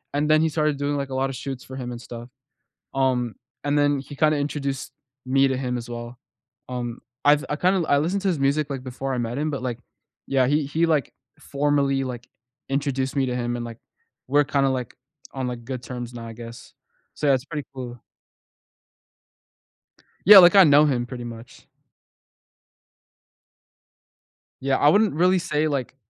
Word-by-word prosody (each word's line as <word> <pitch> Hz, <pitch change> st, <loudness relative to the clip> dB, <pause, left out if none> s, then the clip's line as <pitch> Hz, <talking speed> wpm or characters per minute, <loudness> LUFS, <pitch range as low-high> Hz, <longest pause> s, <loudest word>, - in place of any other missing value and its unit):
and 145 Hz, +1 st, +1 dB
then 155 Hz, 0 st, +5 dB
he 160 Hz, -, +2 dB
started 150 Hz, -1 st, 0 dB
doing, 145 Hz, +1 st, -1 dB
like, 140 Hz, -1 st, -3 dB
a -, -, -6 dB
lot 135 Hz, +1 st, 0 dB
of 135 Hz, -, -5 dB
shoots 130 Hz, 0 st, -6 dB
for 130 Hz, -, -10 dB
him 125 Hz, -2 st, -5 dB
and 120 Hz, -1 st, -7 dB
stuff, 120 Hz, -1 st, -9 dB, 0.7 s
um, 125 Hz, -3 st, +1 dB, 0.3 s
and 145 Hz, 0 st, +1 dB
then 145 Hz, -1 st, +2 dB
he 135 Hz, +2 st, -9 dB
kinda 155 Hz, +1 st, +2 dB
introduced 140 Hz, -2 st, -3 dB, 0.3 s
me 135 Hz, +1 st, +3 dB
to 130 Hz, -, -1 dB
him 125 Hz, -1 st, -2 dB
as 120 Hz, -1 st, -6 dB
well. 120 Hz, +1 st, -7 dB, 0.5 s
Um, 120 Hz, -2 st, -5 dB, 0.2 s
I've 145 Hz, 0 st, +5 dB
I 145 Hz, -, 0 dB
kinda 180 Hz, +1 st, +1 dB
I 145 Hz, -, +4 dB
listened 180 Hz, +7 st, -1 dB
to 200 Hz, -, +1 dB
his 175 Hz, -5 st, 0 dB
music, 140 Hz, +2 st, +1 dB
like, 135 Hz, -2 st, -5 dB
before 135 Hz, +1 st, -4 dB
I -, -, -2 dB
met 120 Hz, 0 st, -3 dB
him, 155 Hz, +1 st, -1 dB
but, 140 Hz, -3 st, -4 dB
like, 120 Hz, -2 st, -3 dB, 0.5 s
yeah, 130 Hz, -2 st, +3 dB
he 145 Hz, +3 st, +2 dB
he, 160 Hz, +4 st, +1 dB
like, 155 Hz, -6 st, 0 dB, 0.3 s
formally, 140 Hz, -1 st, 0 dB
like, 125 Hz, -2 st, -7 dB, 0.4 s
introduced 135 Hz, -1 st, -1 dB
me 135 Hz, -1 st, +2 dB
to 125 Hz, -, -2 dB
him 120 Hz, 0 st, -2 dB
and, 120 Hz, -, -4 dB
like, 115 Hz, -1 st, -8 dB, 0.5 s
we're 145 Hz, +2 st, +4 dB
kinda, 140 Hz, -1 st, +1 dB
like, 125 Hz, -3 st, -3 dB, 0.4 s
on, 130 Hz, -2 st, -3 dB
like, 120 Hz, -1 st, -6 dB
good 130 Hz, 0 st, -5 dB
terms 120 Hz, 0 st, -7 dB
now, 115 Hz, -1 st, -7 dB
I 115 Hz, -, -7 dB
guess. 115 Hz, +1 st, -11 dB, 0.4 s
So 150 Hz, -, -2 dB
that's 135 Hz, -2 st, +3 dB
pretty 150 Hz, -3 st, -5 dB
cool. 125 Hz, -2 st, -7 dB, 2.3 s
Yeah 205 Hz, +3 st, +11 dB
like, 180 Hz, 0 st, +9 dB
I 195 Hz, -, +10 dB
know 150 Hz, -1 st, +6 dB
him 125 Hz, -5 st, 0 dB
pretty 120 Hz, -1 st, -7 dB
much. 115 Hz, 0 st, -11 dB, 2.9 s
Yeah, 135 Hz, 0 st, +1 dB
I 145 Hz, -, +5 dB
wouldn't 205 Hz, +1 st, +3 dB
really 180 Hz, +3 st, +3 dB
say, 155 Hz, -3 st, 0 dB
like, 135 Hz, -4 st, -3 dB
135 Hz, 185 wpm, -24 LUFS, 125-145 Hz, 2.9 s, Yeah